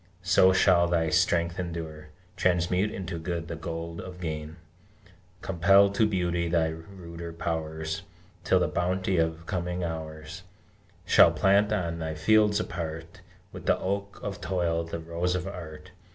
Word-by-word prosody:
So 95 +1 +5
shall 90 -2 +4
thy 80 -2 +1
strength 85 0 +2
endure. 80 -3 -5 0.3
Transmute 90 +2 +1
into 90 -4 -5
good 85 0 -4
the 85 - -5
gold 85 0 -5
of 90 -1 -9
Gain, 80 -2 -5 0.9
Compel 95 +2 +4
to 110 +2 +2
beauty 85 -4 0
thy 80 -1 +2
ruder 85 0 -8
powers, 80 -1 -3 0.4
Till - - +3
the - - +2
bounty 95 +1 0
of 80 0 -1
coming 90 0 -3
hours 80 0 -6 0.6
Shall - - +7
plant, 100 +2 +3
on 85 -5 -1
thy 80 -1 -3
fields 105 +5 +3
apart, 80 -2 -5 0.3
With - - -10
the - - +4
oak 100 +1 -3
of 100 -1 -5
Toil, 85 -3 0
the 85 0 -5
rose 85 +2 -2
of 90 0 -2
Art! 85 -2 -9
85 Hz, 145 wpm, -27 LUFS, 80-95 Hz, 0.9 s, Shall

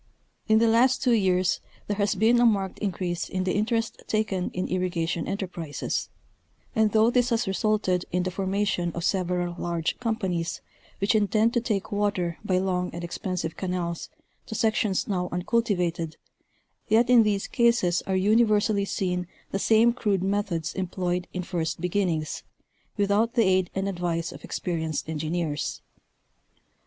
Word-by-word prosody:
In 220 -1 +5
the 230 +1 +4
last 245 +4 +4
two 250 - +3
years 185 -4 +2 0.2
there 205 - -2
has 200 -1 +1
been 230 +3 +4
a 240 - +5
marked 195 -4 0
increase 175 -3 -2
in 185 -1 -1
the 185 - 0
interest 225 +2 -1
taken 210 -4 0
in 180 - -3
irrigation 175 -2 -1
enterprises, 180 -6 -3 0.7
and 220 -1 +3
though 220 +2 +4
this 245 0 +2
has 235 -1 +1
re 195 - -1
sulted 195 -4 +1
in 180 +1 +1
the 185 - -2
formation 190 -2 -1
of 170 - -3
several 180 -2 0
large 170 -2 -2
companies, 190 -8 -2 0.4
which 200 +3 +1
intend 215 +2 +2
to 240 - +2
take 210 -5 -2
water 200 -5 -1
by 190 -3 +1
long 180 -1 0
and 175 - -5
expensive 175 -1 -3
canals 180 -2 -3 0.4
to 220 - -5
sections 215 -3 +1
now 180 -3 -1
uncul 180 +7 +1
tivated, 170 -6 -1 0.7
yet 225 +3 +4
in 245 -1 +7
these 205 -2 +1
cases 235 -8 +2
are 190 - +1
universally 210 0 +3
seen 180 -2 -2 0.2
the 195 - -1
same 225 +3 +4
crude 205 -6 0
methods 190 -4 -1
employed 180 -1 -2
in 180 - -3
first 170 -3 -2
beginnings, 175 -3 -1 0.6
without 205 +3 +2
the 235 - +5
aid 185 -2 +2
and 195 +1 -1
advice 175 -3 -2
of - - -11
experienced 160 -4 -3
engineers. 160 0 -2
190 Hz, 155 wpm, -26 LUFS, 175-215 Hz, 0.7 s, in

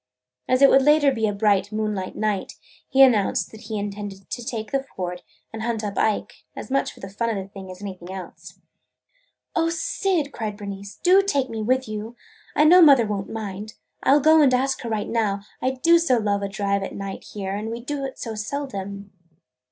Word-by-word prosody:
As 255 +2 +4
it 275 - +9
would 270 - +6
later 295 0 +5
be 225 -4 0
a - - +1
bright 200 -1 +1
moonlight 215 -3 -3
night, 210 -3 -1 0.4
he 270 0 +6
announced 225 -7 +3
that 220 - -12
he 220 - -4
intended 205 -1 -6
to 240 - -4
take 225 -2 -5
the 275 -1 +1
Ford 180 -9 -6 0.3
and 225 - -5
hunt 225 -1 -2
up 205 -1 -3
Ike, 215 -1 -1
as - - -8
much 275 - +1
for - - -17
the 195 - -6
fun 230 +4 -2
of 225 - -1
the 195 -1 -5
thing 195 -1 -10
as 185 +2 -10
anything 185 -2 -7
else. 190 -1 -9 1.0
"O 330 -1 +2
Syd!" 335 -2 -1
cried 215 -4 -4
Bernice, 200 0 -7
"do 370 +2 +6
take 285 -10 0
me 220 -1 -4
with 255 +3 +1
you! 215 +2 -6 0.4
I 300 - +5
know 355 +4 +8
mother 275 -7 +7
won't 205 -2 -3
mind. 215 -1 -6 0.3
I - - +4
'll - - +5
go 315 +2 +6
and 265 -3 +5
ask 265 +1 0
her 235 - -5
right 215 -2 -2
now. 210 -4 0 0.2
I 260 - +2
do 330 +6 +4
so 295 -7 +2
love 205 -2 0
to 200 - -1
drive 200 0 -1
at 195 - -5
night 195 -1 -6
here, 195 -1 -3
and 215 +2 -4
we 230 +1 -4
do 275 +3 -4
it 270 -1 -5
so 225 - -5
seldom!" 205 -4 -5
220 Hz, 215 wpm, -23 LUFS, 200-270 Hz, 1.0 s, it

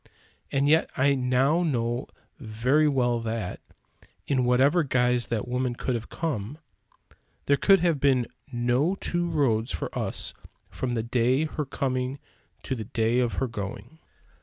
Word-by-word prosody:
And 140 +1 +2
yet 160 +2 +4
I 140 +2 +4
now 130 +5 +2
know 120 -6 -1 0.3
very 125 +6 +2
well 125 -4 +1
that, 110 -4 -4 0.7
in 130 -3 +1
whatever 135 +8 +4
guise 125 -4 +1
that 115 0 -2
woman 125 0 -1
could 130 - -2
have 115 -2 -4
come, 140 -5 -3 0.9
there 140 - +4
could 195 +5 +4
have 170 -5 +2
been 130 -3 +3 0.3
no 125 +8 +1
two 175 -2 -2
roads 125 -8 +1
for - - -4
us - - -3 0.4
from 125 -2 -3
the 115 -2 -1
day 125 +4 +2
of 155 - -4
her 150 - -3
coming 130 0 -2 0.5
to - - -3
the 110 -4 -4
day 115 +1 +1
of 120 -2 +1
her 135 - -1
going. 105 +6 -7
125 Hz, 155 wpm, -26 LUFS, 120-140 Hz, 0.9 s, yet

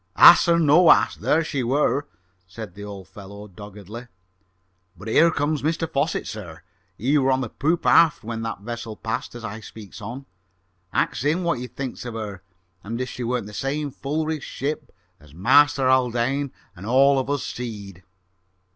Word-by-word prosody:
"Hass 175 - +9
or 170 0 +4
no 165 +2 +5
hass, - - +5
there 160 +2 +1
she 145 -4 -2
wer'," 140 +3 +1 0.4
said 100 0 -9
the 100 +2 -10
old 100 -3 -9
fellow 100 +3 -11
doggedly. 105 +4 -10 0.9
"But 100 +6 -10
here 165 +9 +5
comes 150 -1 -1
Mr 165 +2 -1
Fosset, 155 0 -1
sir. 95 -7 -8 0.3
He 140 +7 +2
were 135 0 +2
on 130 0 +1
the 125 - -4
poop 165 +8 -1
aft 165 -7 +5
when 115 0 -5
that 115 -3 -5
vessel 115 0 -6
passed 110 +2 -4
as 120 -1 -7
I 110 0 -6
speaks 110 -1 -11
on. 120 +6 -7 0.7
Ax - - 0
him 160 +6 +1
what 170 -7 0
he 125 - -5
thinks 130 +1 -6
of 120 -2 -6
her 105 -4 -6 0.4
and 115 +4 -5
if 130 0 -3
she 125 - -6
weren't 120 -1 -1
the 105 - -10
same 140 +4 -2
full 150 +4 -3
rigged 155 -2 -3
ship 145 +3 -4 0.3
as 75 -1 -18
Master 135 - +4
Haldane 130 +2 +1 0.2
and 95 +4 -9
all 135 +3 +5
of 130 - -3
us 145 -1 -1
seed?" 100 -7 -7
125 Hz, 180 wpm, -23 LUFS, 105-145 Hz, 0.9 s, Hass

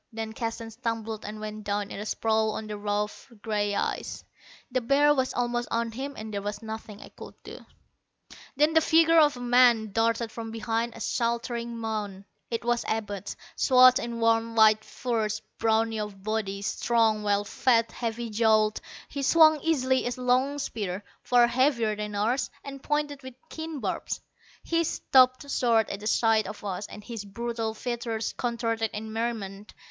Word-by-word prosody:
Then 220 -1 -5
Keston 225 0 -4
stumbled 225 -2 -4
and 215 +1 -6
went 215 0 -6
down 205 0 -2
in - - -6
a 210 - -5
sprawl 220 0 +1
on 220 - -5
the 210 0 -5
rough 205 +4 -3
gray 205 -2 0
ice. - - -3 0.5
The 255 0 0
bear 285 +4 +4
was 260 -2 0
almost 240 0 -1
on 230 0 -1
him 270 +5 -5
and 215 0 -7
there 200 - -2
was 205 +1 -5
nothing 220 -1 -7
I - - -11
could - - -12
do. - - -9 1.0
Then 300 +3 +3
the 320 - +5
figure 330 +1 +5
of 295 -4 +4
a - - -8
man 240 -3 +4
darted 230 +1 +1
from 225 0 -6
behind 225 +1 -2
a - - -10
sheltering 235 0 -2
mound. 210 -4 -4 0.2
It 235 0 -3
was 240 0 +1
Abud, 205 -3 -3 0.2
swathed 255 -1 +6
in 235 0 -4
warm 230 0 +2
white 215 -1 +5
furs, 220 -4 -2 0.2
brawny 225 0 +1
of 205 -2 -6
body, 205 -2 -2
strong, 220 +1 +1
well 205 -1 +1
fed, 230 +2 +2
heavy 230 -1 -4
jowled. 215 -1 +3 0.3
He 280 - -5
swung 310 +2 +6
easily 260 -6 +1
a - - -1
long 255 +3 +2
spear, 205 -8 -4 0.2
far 245 -1 +4
heavier 235 -3 +2
than 210 0 -5
ours, 230 +6 0
and 275 -1 -8
pointed 295 -1 -1
with 260 -2 -10 0.2
keen 320 -2 -5
barbs. - - -3 0.4
He 335 0 +1
stopped 255 -3 +3
short 230 -4 +2
at 200 - -5
the 210 - -5
sight 220 -2 +3
of 210 +1 -8
us, 200 +1 -4
and 210 - -11
his 225 -2 -6
brutal 225 +1 -4
features 230 -1 -3
contorted 230 -2 -1
in 220 +1 -6
merriment. 215 -3 -4
230 Hz, 170 wpm, -27 LUFS, 215-245 Hz, 1.0 s, swathed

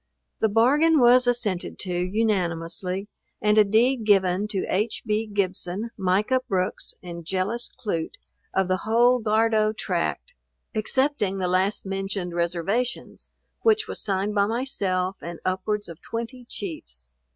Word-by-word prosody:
The 220 - +2
bargain 285 +9 +4
was 250 0 +6
assented 220 -7 0
to 185 -2 -4
unanimously, 180 -1 -1 0.3
and 210 0 +3
a - - +8
deed 230 +4 +2
given 195 -1 +3
to 200 -3 -2
H. 210 +4 -1
B. 215 0 0
Gibson, 200 +1 -2
Micah 200 +7 +1
Brooks 185 -1 -1
and 170 -1 -7
Jellis 190 +7 -1
Clute, 200 -10 -4 0.4
of 190 -1 +1
the 185 0 +1
whole 240 +5 +3
Gardow 215 0 +2
tract, - - -2 0.4
excepting 225 -2 +1
the 185 -1 -1
last 190 +4 +1
mentioned 195 -2 -3
reservations, 175 +8 -2 0.3
which 440 -1 +3
was - - -4
signed 200 0 -1
by 200 -1 +3
myself 195 -6 -1
and 170 0 -7
upwards 205 +3 -1
of 170 -2 -10
twenty 235 +2 -6
Chiefs. 150 - -7
205 Hz, 135 wpm, -25 LUFS, 185-230 Hz, 0.4 s, a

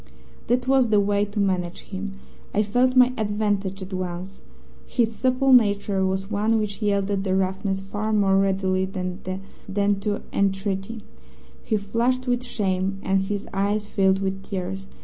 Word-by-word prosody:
"That 245 +2 +1
was 265 -3 +4
the 210 -1 +4
way 205 0 +2
to 205 +1 -5
manage 185 -3 0
him. 195 0 -6 0.4
I 210 - +4
felt 245 +5 +2
my 255 0 +6
advantage 205 -2 -1
at 190 +1 -9
once. 185 +1 -5 0.5
His 230 -3 0
supple 260 +3 +3
nature 205 -4 +3
was 190 +1 -1
one 215 +2 +2
which 210 -1 -3
yielded 200 -1 +1
to 190 -1 0
roughness 190 +1 -1
far 205 +3 -3
more 200 -2 +3
readily 190 -1 +1
than 185 -2 -4 0.5
to 205 0 +1
entreaty. 195 +2 -1 0.6
He 220 - 0
flushed 235 +5 0
with 245 -1 0
shame, 195 -4 -1
and 190 0 +1
his 205 +1 -3
eyes 205 +2 0
filled 190 -2 +2
with 195 0 -2
tears. 190 0 -5
200 Hz, 150 wpm, -24 LUFS, 190-215 Hz, 0.6 s, my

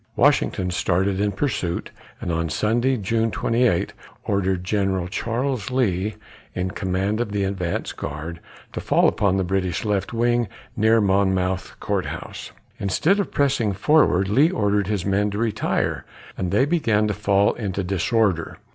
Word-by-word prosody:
Washington 90 -1 +2
started 95 +2 0
in 105 0 +1
pursuit, 95 -7 -2 0.3
and 90 - -3
on 85 0 -1
Sunday, 120 +9 +1
June 115 +2 0
28, 115 -4 +1 0.3
ordered 95 -2 0
General 95 -2 0
Charles 115 +3 -2
Lee, 105 -5 0 0.4
in 90 0 -2
command 95 +3 -1
of 115 -4 -3
the 100 -1 0
advance 95 -3 -2
guard, 75 +4 -6 0.3
to - - -4
fall - - +3
upon 100 -3 +1
the 95 - +1
British 95 +1 -1
left 100 -2 -1
wing 120 0 +1 0.3
near 110 +1 +4
Monmouth 95 -2 0
Court - - -1
House. - - -7 0.3
Instead 160 - +2
of 200 - -2
pressing 130 -7 +1
forward, 100 - +3
Lee 135 +11 +4
ordered 105 - +1
his 100 -4 -1
men 100 +1 +1
to 100 - -4
retire, 110 -1 -1 0.3
and 90 - -2
they 105 +8 +3
began 115 -10 +2
to 105 - 0
fall 100 0 +2
into 100 -4 -3
disorder. 95 -1 0
100 Hz, 150 wpm, -23 LUFS, 95-115 Hz, 0.4 s, near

